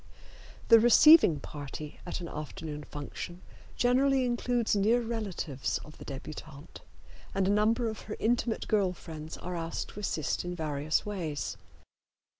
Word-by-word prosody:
The 230 -1 +9
receiving 240 - +7
party 145 +1 -8
at 175 - -4
an 170 - -5
afternoon 150 -1 -6
function 175 +5 -7 0.3
generally 260 +2 +3
includes 240 -2 +1
near 215 +4 +3
relatives 210 - -3
of 150 - -14
the - - -9
debutante, 145 +2 -9 0.5
and 190 -1 +2
a - - +3
number 225 +3 +2
of 220 -1 -5
her 210 - -4
intimate 235 0 0
girl 200 -4 +2
friends 160 -3 -8
are 180 0 -5
asked 165 -1 -4
to - - -9
assist 160 -7 -1
in 175 0 -4
various 155 -2 -1
ways. 170 -8 -3
180 Hz, 140 wpm, -30 LUFS, 155-230 Hz, 0.5 s, The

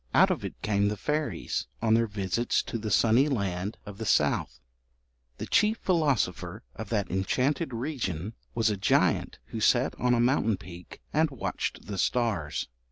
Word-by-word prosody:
Out - - +6
of - - -2
it - - -6
came 100 -1 +2
the 105 0 -1
fairies, 150 - -2
on 110 -1 +2
their 115 0 +3
visits 100 +2 0
to 115 - -4
the 110 0 -4
sunny 115 +7 +4
land 100 -5 -2
of 100 0 -9
the 110 - -3
south. - - +1 0.8
The - - -4
chief 215 +1 +3
philosopher 145 - 0
of 110 -2 -7
that 105 -4 -1
enchanted 130 - 0
region 115 - -3 0.2
was 115 -2 +2
a 105 - -2
giant 95 - +2
who - - -4
sat - - +3
on 125 0 +3
a - - +1
mountain 120 -4 +2
peak 90 +1 -11
and 155 +1 +3
watched 135 -4 -4
the 100 -1 -5
stars. 110 -12 0
110 Hz, 165 wpm, -28 LUFS, 100-130 Hz, 0.8 s, Out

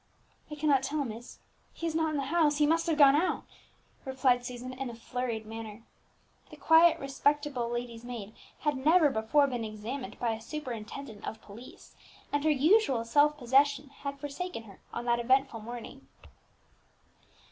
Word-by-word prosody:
"I 300 - -6
cannot 290 -3 +2
tell, 285 +2 -2
miss; 235 +1 -8 0.4
he - - -6
is 330 - -1
not 320 0 +1
in 305 - -2
the 280 - -1
house; 300 0 +2
he 300 - +4
must 330 +3 +2
have 320 -2 +1
gone 280 -2 +7
out," 335 +5 0 0.6
replied 260 -2 +1
Susan 250 +1 -6
in 260 0 -5
a 235 - -8
flurried 235 -1 -4
manner. 220 0 -8 0.7
The - - -11
quiet, 325 +1 +5
respectable, 275 -2 0
lady's 240 -1 -5
maid 230 -4 -7 0.3
had 295 -1 +1
never 315 -1 +5
before 225 +6 +3
been 245 -4 -3
examined 220 +5 -6
by 235 -2 0
a 220 0 -5
superintendent 235 -3 -7
of 220 - -5
police, 220 +5 -13 0.4
and 290 0 +1
her 315 - +3
usual 295 - +3
self 290 +5 +3
possession 280 +2 +2
had 280 0 -7
forsaken 290 -1 -5
her 200 -4 -15
on 235 - -5
that 240 0 +2
eventful 260 0 +2
morning. 240 +4 -9
265 Hz, 165 wpm, -30 LUFS, 235-295 Hz, 0.7 s, gone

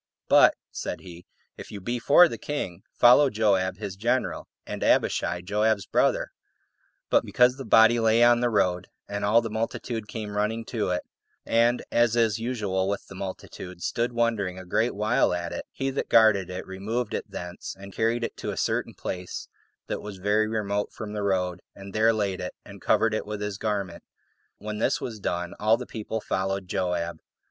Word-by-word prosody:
"But," - - +6 0.2
said - - -5
he, 90 -1 -12 0.3
"if - - -10
you 105 - -6
be 120 +6 -3
for 160 +8 +7
the - - -6
king, 95 -13 -4
follow 125 +4 +6
Joab 100 -4 +1
his 100 -3 -5
general, 120 +6 -1 0.2
and - - -5
Abishai, 85 0 +2
Joab's 105 +1 +1
brother:" - - +1 0.8
but - - +4
because 125 +1 +3
the 135 - -7
body 115 +1 +6
lay 115 +1 +4
on 120 0 +6
the 120 0 +2
road, 90 -4 +1 0.2
and 100 0 -4
all 110 +3 +4
the 115 - -4
multitude 115 0 -3
came 105 -2 -6
running 110 +2 -1
to 110 -6 -2
it, 90 0 -1 0.4
and, 120 +1 +2
as 120 -1 +3
is 115 -2 +2
usual 105 -6 -1
with 100 - -3
the - - -12
multitude, 95 -1 -7
stood 120 +1 -1
wondering 115 -6 0
a 95 - -9
great 110 +6 0
while 105 -3 +2
at 85 -1 -4
it, - - -6
he 135 0 -2
that - - -3
guarded 100 -5 +5
it 90 0 -5
removed 105 +6 -3
it - - -4
thence, 90 0 -7
and 100 0 -11
carried 115 +1 0
it - - -3
to - - -4
a - - -4
certain - - -1
place 90 -1 -6 0.4
that - - -4
was 105 -2 -8
very 105 +3 +2
remote 105 -2 -2
from 105 -1 -7
the 105 - -3
road, 90 -3 0
and 100 0 -10
there 110 +1 +4
laid 100 -4 -1
it, 90 - -5
and - - -12
covered 115 -1 +2
it 110 - -2
with 105 -1 -4
his 105 -1 -4
garment. 100 -5 -2 0.6
When 105 0 -5
this - - +1
was 110 -4 -6
done, 90 -2 -3
all 110 +2 +4
the 125 - -6
people 110 0 -5
followed 95 -1 -2
Joab. 90 -2 -2
105 Hz, 190 wpm, -26 LUFS, 95-115 Hz, 0.8 s, for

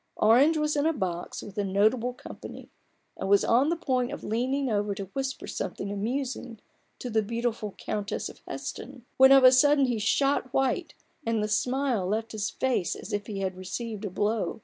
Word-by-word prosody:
Orange 265 +9 +5
was 300 0 0
in 290 +1 +2
a 325 - +2
box 180 - -4
with 205 0 -7
a - - +1
notable 215 +6 +2
company, - - -10 0.5
and 190 - -3
was 200 0 +5
on 255 +6 +3
the 340 - +1
point 255 -6 -1
of - - -7
leaning 260 +5 -1
over 205 -3 0
to 195 -1 -7
whisper 270 -1 -3
something 200 - -4
amusing 240 +3 -3 0.4
to - - -6
the 220 0 +3
beautiful 230 -1 -3
Countess 205 -1 -3
of - - -12
Heston, 260 -3 -7
when 265 +1 +8
of 270 -1 +8
a 255 - +9
sudden 285 +2 +5
he 240 -3 -1
shot 275 +5 +1
white, 270 +6 0 0.3
and 225 -3 0
the - - 0
smile 245 -1 0
left 220 +3 -2
his 215 -1 -2
face 255 -9 -1
as 215 - -8
if 205 0 -2
he 200 -2 -4
had 190 -1 -2
received 210 +4 -5
a 205 - -2
blow. 210 +5 -1
230 Hz, 195 wpm, -27 LUFS, 205-265 Hz, 0.5 s, a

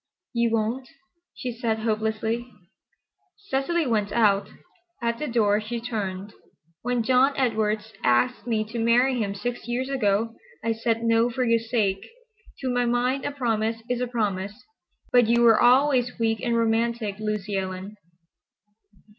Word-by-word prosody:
"You 235 -1 +2
won't?" 230 +4 -1 0.5
she 250 - -4
said 230 -2 -1
hopelessly. 220 +2 -1 0.9
Cecily 340 -2 -1
went 210 -5 0
out. 200 -3 +3 0.5
At 235 -1 -1
the 300 - -2
door 215 -3 +2
she 235 +2 -4
turned. 205 -4 -4 0.5
"When 245 -1 0
John 260 +4 +3
Edwards 220 -4 0
asked 125 - +2
me 220 -2 +1
to 235 - -3
marry 245 +2 +3
him 200 -2 -2
six 245 +2 -4
years 250 +2 -2
ago, 225 -3 +1 0.3
I 230 - +1
said 230 0 -1
no 230 +1 +3
for 255 +1 -1
your 230 -1 +3
sake. 220 -4 -1 0.6
To 260 - -1
my 245 0 +1
mind 250 +3 0
a - - -1
promise 225 -4 -1
is 245 0 -1
a 250 - 0
promise. 210 -2 -3 0.5
But 245 -2 +5
you 235 +1 +3
were 230 -2 +6
always 250 0 +4
weak 225 -1 0
and 235 -2 0
romantic, 225 -2 0
Lucy 210 -1 -2
Ellen." 190 +1 -4
230 Hz, 145 wpm, -25 LUFS, 215-245 Hz, 0.9 s, were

